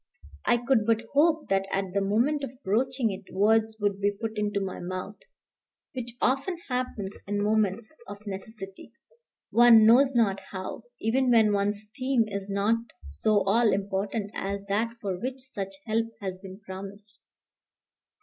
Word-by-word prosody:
I 240 - +5
could 235 -2 +1
but 230 0 +2
hope 315 +2 +3
that, 195 0 +1
at 195 -1 -2
the 200 - +1
moment 240 +9 +1
of 260 0 -7
broaching 245 +3 +1
it, 195 0 -9
words 220 +3 +2
would 205 -1 0
be 200 - +3
put 220 +2 -5
into 205 -1 0
my 195 -1 -4
mouth, 185 +3 -5 0.7
which 240 -3 -5
often 275 +8 +1
happens 250 -6 -2
in 205 0 -1
moments 215 +5 +1
of 205 - -7
necessity, 195 +1 -7 0.6
one 235 -2 +8
knows 260 +4 +6
not 200 -5 +3
how, 190 +4 -6
even 255 +4 +1
when 220 -3 +5
one's 205 +1 0
theme 255 -3 +1
is 200 -1 -5
not 200 +3 +2 0.3
so 200 - +2
all 215 +3 +3
important 200 +2 -2
as 200 0 -4
that 210 +4 0
for 195 -5 -3
which 255 +5 -3
such 200 -7 -6
help 225 +1 0
has 190 -2 -5
been 190 0 -10
promised. 200 +2 -9
210 Hz, 155 wpm, -27 LUFS, 195-235 Hz, 0.7 s, one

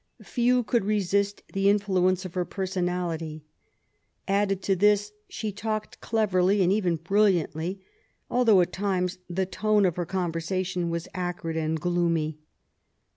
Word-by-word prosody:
Few 245 0 +2
could 235 0 +1
resist 200 0 0
the 195 0 +3
in 205 - +5
^uence 185 -2 +1
of 180 - -7
her 180 - 0
personality. 175 -4 -3 0.8
Added 195 -1 +1
to 195 - +2
this 205 +2 +3 0.2
she 215 -1 -4
talked 215 +1 -4
cleverly, 195 -3 +2
and 180 - +3
even 185 -5 +1
brilliantly, 180 0 +1 0.4
although, 230 -6 +4
at 175 - -1
times, 185 -2 -1
the 185 +2 0
tone 210 +2 +2
of 180 -2 0
her 175 -2 -2
conversation 180 0 -2
was 170 0 -3
acrid 175 -3 -3
and 160 0 -1
gloomy. 165 -2 0
185 Hz, 135 wpm, -26 LUFS, 175-205 Hz, 0.8 s, in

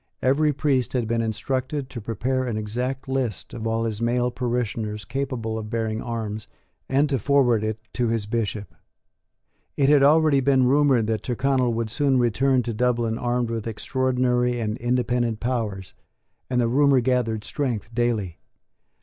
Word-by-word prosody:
Every 150 +4 +3
priest 135 -4 0
had 120 -4 0
been 115 0 0
instructed 130 +5 -2
to 120 - -6
prepare 125 +5 -1
an 115 -3 -2
exact 125 +6 -3
list 130 -7 -2
of 115 -1 -4
all 115 0 0
his 110 -1 -3
male 120 +1 +1
parishioners 115 -4 -2
capable 125 -4 -3
of 105 -1 -7
bearing 110 -1 -2
arms, 110 -2 -4 0.4
and 140 +3 +3
to 135 -3 0
forward 125 -3 +3
it 110 0 -2 0.2
to 120 -1 0
his 115 -2 0
Bishop. 105 -2 -3 1.0
It 140 -1 +3
had 145 -1 +6
already 150 0 +5
been 135 -1 +3
rumoured 135 -3 +3
that 110 -1 -1
Tyrconnel 130 0 +1
would 115 -1 -2
soon 140 -1 +2
return 125 +2 +2
to 115 - -3
Dublin 115 -1 0
armed 120 -1 -1
with 115 -1 -3
extraordinary 125 +1 0
and 110 -2 -2
independent 120 -2 0
powers; 110 -7 -3 0.6
and 125 -1 +1
the 120 - +2
rumour 140 +2 +4
gathered 120 -3 0
strength 120 -6 -3
daily. 115 -7 -1
120 Hz, 160 wpm, -24 LUFS, 110-130 Hz, 1.0 s, had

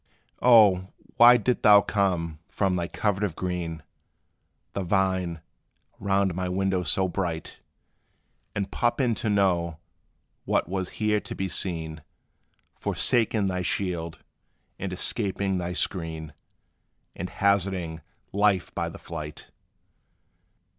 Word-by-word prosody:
O 105 -7 +6 0.3
why 120 +1 +9
didst 120 +2 0
thou 105 -2 +8
come 90 -7 -1
from 95 -2 0
thy 85 -1 -1
covert 105 +1 -1
of 95 -6 -1
green, 85 -4 -4 0.9
The 100 - -2
vine, 95 -3 0 0.6
round 95 -2 +1
my 90 +1 -2
window 95 0 0
so 95 +3 +1
bright; 85 -3 -4 1.0
And 100 -1 -2
pop 120 +2 0
in 125 -4 +2
to 110 - -2
know 90 -5 +1 0.7
what - - +1
was 95 0 -3
here 105 -1 +2
to - - -8
be 95 - -2
seen, 80 -4 -3 0.8
Forsaking 110 -3 +2
thy 90 -1 -1
shield, 85 -3 -2 0.6
and 95 0 -3
escaping 95 0 -1
thy 90 0 -3
screen, 80 -4 -3 0.8
And 90 +2 -5
hazarding 95 -4 0 0.3
life 100 -2 +2
by - - -2
the - - -10
flight? 75 -2 -8
95 Hz, 120 wpm, -26 LUFS, 85-100 Hz, 1.0 s, why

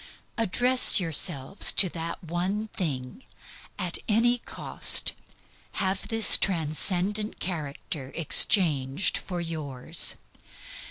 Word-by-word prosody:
Address 245 +3 +3
yourselves 165 -2 +2
to 195 - +7
that 165 +2 -7
one 185 +6 -4
thing; 140 - -6 0.5
at 180 -3 -3
any 240 +3 +2
cost - - -2 0.6
have 190 0 -3
this 225 -1 +5
transcendent 185 +5 -1
character 145 -4 -6
exchanged 155 -2 +2
for 180 -2 -7
yours. 155 -3 -1
175 Hz, 90 wpm, -25 LUFS, 155-205 Hz, 0.6 s, to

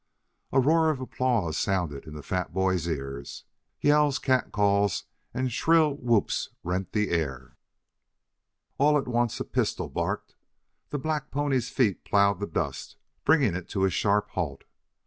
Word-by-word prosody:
A 135 - +4
roar 160 +4 +4
of 150 -4 -1
applause 125 -9 0
sounded 85 -7 -1
in 75 - -8
the 75 - -8
fat 90 +4 -2
boy's 95 -2 0
ears. 70 -3 -5 0.4
Yells, 145 -1 +4
cat 130 -2 +1
calls 100 -1 +2 0.3
and 130 +1 -2
shrill 160 +3 +4
whoops 120 -6 0
rent 90 +2 -2
the 105 -2 0
air. 70 -4 -2 1.2
All 150 +2 +5
at 140 - -2
once 120 -1 0
a - - -3
pistol - - -1
barked, - - -3 0.6
the 145 - -2
black 150 +1 -2
pony's 140 -4 0
feet 110 -8 +1
plowed 100 -2 +3
the 105 - -3
dust, 80 - -3 0.3
bringing 135 - +4
it 90 0 -5
to 95 -1 +1
a 95 - +1
sharp 105 +3 +1
halt. 75 -7 -3
105 Hz, 150 wpm, -27 LUFS, 90-135 Hz, 1.2 s, All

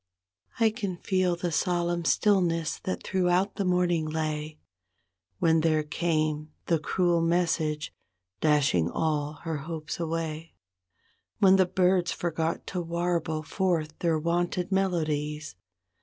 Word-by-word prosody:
I 225 -1 +4
can 200 -5 -4
feel 185 -1 +1
the 175 0 -3
solemn 175 0 0
stillness 170 -5 +2
that 185 - -3
throughout 185 +1 +1
the 200 - 0
morning 180 -3 +1
lay. 155 -1 -3 0.8
When 160 +4 +3
there 155 -1 +2
came 155 -1 -1 0.2
the 165 -2 +2
cruel 175 +1 +1
message, 165 -3 0 0.5
dashing 145 - +3
all 150 - -1
her 165 -2 -2
hopes 155 +2 -5
away; 165 -1 -3 0.8
When 195 -1 +6
the 185 -1 +4
birds 180 -1 +2
forgot 165 -1 -2
to 180 - -1
warble 170 -2 -1
forth 165 -2 -1
their 165 -2 +1
wonted 175 +3 -1
melodies. 155 - -1
165 Hz, 120 wpm, -27 LUFS, 155-180 Hz, 0.8 s, When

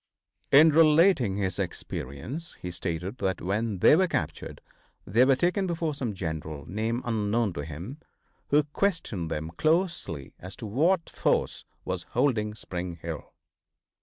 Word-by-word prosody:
In 155 +4 +8
relating 155 - +5
his 95 -3 -2
experience 115 - -5
he 90 - -5
stated 90 +5 -4
that 95 -2 -1
when 105 +3 -1
they 90 - +6
were 185 +3 +3
captured 80 - -3 0.5
they 115 +6 +4
were 135 0 +5
taken 180 +6 +1
before 165 -3 -1
some 125 -7 -3
general, 80 -4 -5
name 110 +6 -2
unknown 110 -2 0
to 75 - -4
him, 85 - -7 0.5
who 150 +1 +4
questioned 150 - -1
them 80 0 -3
closely 155 - 0
as 95 +2 -9
to - - -8
what 160 - +2
force - - 0 0.2
was - - -4
holding 105 -6 +1
Spring 90 -4 -5
Hill. 80 -2 -7
110 Hz, 140 wpm, -27 LUFS, -, 0.5 s, In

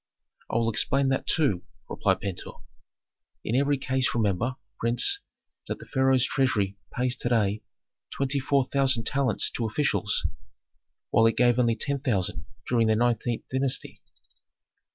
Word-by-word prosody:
"I - - -4
will 115 0 +2
explain 135 +5 +1
that 135 - -1
too," 135 - +2 0.3
replied - - 0
Pentuer. 100 -3 -4 0.9
"In 115 - -1
every 140 +2 +2
case 130 -1 0
remember, 115 +3 0 0.2
prince, 120 - +2 0.5
that - - -3
the - - -12
pharaoh's 130 -2 +2
treasury 110 -8 0 0.2
pays 125 +1 0
to 120 - -2
day 105 -3 +1 0.5
twenty 140 +1 -1
four 135 0 +2
thousand 130 -3 +2
talents 135 -6 +1
to 115 - -2
officials, 110 -3 0 0.9
while 115 0 +5
it 115 - 0
gave 120 0 +4
only 115 -2 +3
ten 140 +3 -1
thousand 105 -9 -2 0.2
during 115 -2 +2
the 110 - +3
nineteenth 120 0 0
dynasty." 130 0 -1
125 Hz, 140 wpm, -26 LUFS, 115-135 Hz, 0.9 s, while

